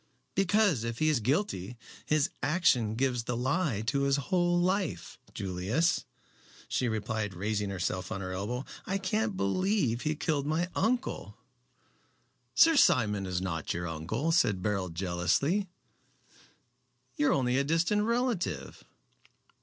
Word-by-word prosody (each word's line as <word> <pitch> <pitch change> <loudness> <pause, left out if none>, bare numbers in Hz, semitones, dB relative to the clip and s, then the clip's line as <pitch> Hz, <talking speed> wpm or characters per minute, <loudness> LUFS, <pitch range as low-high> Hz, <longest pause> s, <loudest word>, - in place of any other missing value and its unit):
"Because, 195 - +2
if 115 0 -3
he 155 0 +2
is 150 -5 +2
guilty, 125 - -1 0.3
his 150 -2 +2
action 130 -10 +2
gives 125 -1 0
the 125 - -2
lie 130 - 0
to 125 +6 0
his 140 0 +3
whole 175 +4 +1
life, 180 - -1
Julius," 100 - 0 0.6
she 125 - 0
replied, 110 -2 -2
raising 105 +2 -1
herself 90 0 -3
on 105 - -3
her 95 -1 -5
elbow. 105 +8 -3 0.2
"I 195 - 0
can't 205 +2 -1
believe 135 - +1
he 155 0 -1
killed 150 -3 -1
my 165 +4 0
uncle." 245 +5 -1 1.2
"Sir 330 0 +6
Simon 105 - +3
is 90 -1 -2
not 80 -5 -3
your 85 0 -3
uncle," 95 - -2
said 110 - +2
Beryl, 95 -3 -1
jealously. 95 - 0 1.5
"You 145 - +2
are - - +4
only 130 -1 +1
a - - +2
distant 165 +8 +1
relative." 235 -3 -1
130 Hz, 135 wpm, -30 LUFS, -, 1.5 s, Sir